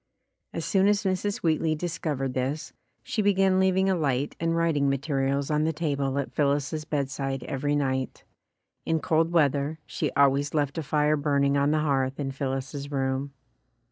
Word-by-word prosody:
As - - -4
soon 195 -1 +3
as 205 0 +2
Mrs. 195 +1 -1
Wheatley 160 -1 +2
discovered 150 -5 -3
this, 130 +4 -3 0.3
she 220 - -1
began 195 -2 +3
leaving 190 0 +3
a 190 - +3
light 145 -5 -1
and 165 0 0
writing 155 -4 +2
materials 140 0 0
on 150 0 +2
the 160 - +1
table 140 -4 -1
at 140 - -2
Phil 145 - +2
lis's 145 +2 -3
bedside 135 -3 -2
every 145 +2 -1
night. 130 -2 -1 0.6
In 160 0 0
cold 165 +2 +1
weather, 145 -2 +2
she - - -2
always 140 +1 +3
left 145 +1 0
a - - -1
fire 150 +1 +2
burning 140 -1 +1
on 140 0 +2
the 155 0 +2
hearth 135 -2 0
in 135 -2 -2
Phillis's 135 +1 -4
room. 135 0 -1
145 Hz, 170 wpm, -26 LUFS, 135-160 Hz, 0.6 s, soon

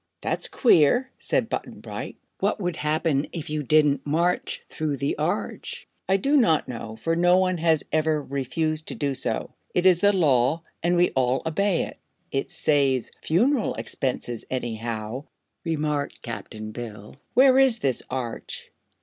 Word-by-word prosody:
"That's - - +1
queer," 245 - +4
said - - 0
Button - - -5
Bright. - - -6 0.2
"What - - 0
would 175 -4 -2
happen 150 -1 0
if 160 -3 -5
you 155 0 -1
didn't 145 -1 +3
march 170 +4 0
through 150 -3 -2
the 140 +2 -1
Arch?" 210 - -3 0.2
"I 195 - +5
do 275 +10 +1
not 165 - +3
know, 115 -2 -6
for 165 +8 -1
no 175 +1 +5
one 185 -2 +1
has 160 -2 +2
ever 155 0 +2
refused 150 +3 -2
to - - -4
do 140 -2 -1
so. 120 -3 -2 0.2
It 180 - +2
is 180 -2 +6
the 205 - +6
Law, 155 -4 +2 0.2
and 175 +1 +2
we 175 0 +3
all 130 0 +1
obey 185 +3 +1
it." - - -8 0.3
"It 135 - -1
saves 135 -4 +1
funeral 235 - +2
expenses, 125 -3 -3
anyhow," 115 0 -4 0.4
remarked 150 -3 -2
Cap'n 110 -2 -6
Bill. 110 -2 -8 0.2
"Where 260 +1 +7
is 265 -4 +5
this 135 - 0
Arch?" 125 -3 -5
155 Hz, 155 wpm, -25 LUFS, 130-175 Hz, 0.4 s, Where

